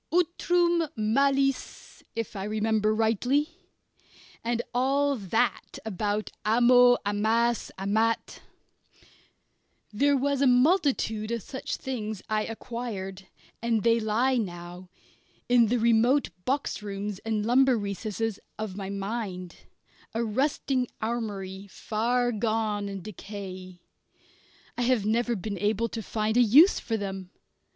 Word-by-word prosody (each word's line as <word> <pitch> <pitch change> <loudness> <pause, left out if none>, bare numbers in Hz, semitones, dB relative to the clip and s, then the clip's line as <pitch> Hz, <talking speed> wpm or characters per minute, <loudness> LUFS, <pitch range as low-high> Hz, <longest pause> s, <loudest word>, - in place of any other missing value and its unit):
"utrum 345 -1 +2
malis" 275 +5 0
if 230 -2 -4
I 195 - -4
remember 215 0 +1
rightly 245 - +1 0.9
and 235 0 -1
all 275 +3 +2
that 225 +2 -1
about 210 0 -2
amo, 245 +2 +6
amas, 220 +3 +1
amat. 220 +4 0 1.5
There 280 +6 +3
was 280 +1 0
a 275 - +5
multitude 250 - +2
of 230 -3 -2
such 265 - -5
things 220 -6 -5
I 215 0 0
acquired, 220 -5 -6 0.3
and 230 -2 +1
they 230 0 +4
lie 235 +4 +1
now, 175 -3 -5 0.6
in 245 -2 +5
the 245 +3 +1
remote 235 +4 +3
box 275 -3 -1
rooms 200 -1 -5
and 220 -2 -2
lumber 255 +1 +4
recesses 210 +1 -3 0.2
of 215 -3 -5
my 195 -1 -5
mind, 195 -3 -4 0.6
a 230 - +1
rusting 260 +2 0
armoury 200 -4 -4
far 235 +6 0
gone 215 -2 -1
in 195 -2 -6
decay. 185 -3 -8 0.9
I - - -3
have 240 -4 +2
never 235 +2 +1
been 200 0 -5
able 215 +3 0
to 225 - -5
find 220 +2 -1
a - - +7
use 280 - +6
for 225 -1 -2
them. 195 -2 -5
225 Hz, 120 wpm, -27 LUFS, 205-245 Hz, 1.5 s, a